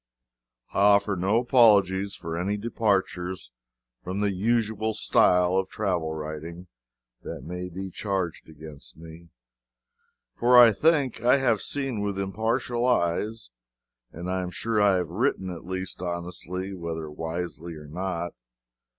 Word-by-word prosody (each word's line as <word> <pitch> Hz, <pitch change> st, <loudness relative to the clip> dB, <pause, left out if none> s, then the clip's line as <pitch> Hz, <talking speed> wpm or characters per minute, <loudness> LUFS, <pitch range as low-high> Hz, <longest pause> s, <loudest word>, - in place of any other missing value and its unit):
I -, -, 0 dB
offer 100 Hz, 0 st, +4 dB
no 95 Hz, +5 st, +1 dB
apologies 100 Hz, -6 st, +4 dB
for 85 Hz, -1 st, -5 dB
any 95 Hz, +5 st, -1 dB
departures 95 Hz, -, -1 dB, 0.5 s
from 95 Hz, +2 st, -4 dB
the 100 Hz, -1 st, +1 dB
usual 110 Hz, +1 st, 0 dB
style 90 Hz, -3 st, +3 dB
of 95 Hz, 0 st, 0 dB
travel 90 Hz, -7 st, -1 dB
writing 80 Hz, +3 st, -6 dB, 0.6 s
that -, -, -7 dB
may 90 Hz, +1 st, -5 dB
be 95 Hz, +2 st, -6 dB
charged 95 Hz, -5 st, -3 dB
against 75 Hz, -1 st, -11 dB
me 80 Hz, +1 st, -12 dB, 1.0 s
for 125 Hz, +1 st, +4 dB
I 120 Hz, -2 st, +9 dB
think 140 Hz, 0 st, +2 dB
I 125 Hz, +3 st, +5 dB
have 120 Hz, -6 st, +2 dB
seen 135 Hz, -6 st, -2 dB
with 100 Hz, -1 st, -2 dB
impartial 110 Hz, +5 st, -1 dB
eyes, 110 Hz, -, 0 dB, 0.6 s
and 85 Hz, +2 st, -7 dB
I 95 Hz, 0 st, -1 dB
am 90 Hz, -, -4 dB
sure 110 Hz, +3 st, -1 dB
I 100 Hz, -2 st, +5 dB
have 90 Hz, -3 st, -1 dB
written 95 Hz, -1 st, -1 dB
at 85 Hz, -2 st, -9 dB
least 95 Hz, -1 st, -5 dB
honestly, 90 Hz, +2 st, -4 dB
whether 85 Hz, -3 st, -5 dB
wisely 85 Hz, +2 st, -5 dB
or 75 Hz, -1 st, -10 dB
not. 85 Hz, +2 st, -4 dB
95 Hz, 135 wpm, -26 LUFS, 85-110 Hz, 1.0 s, I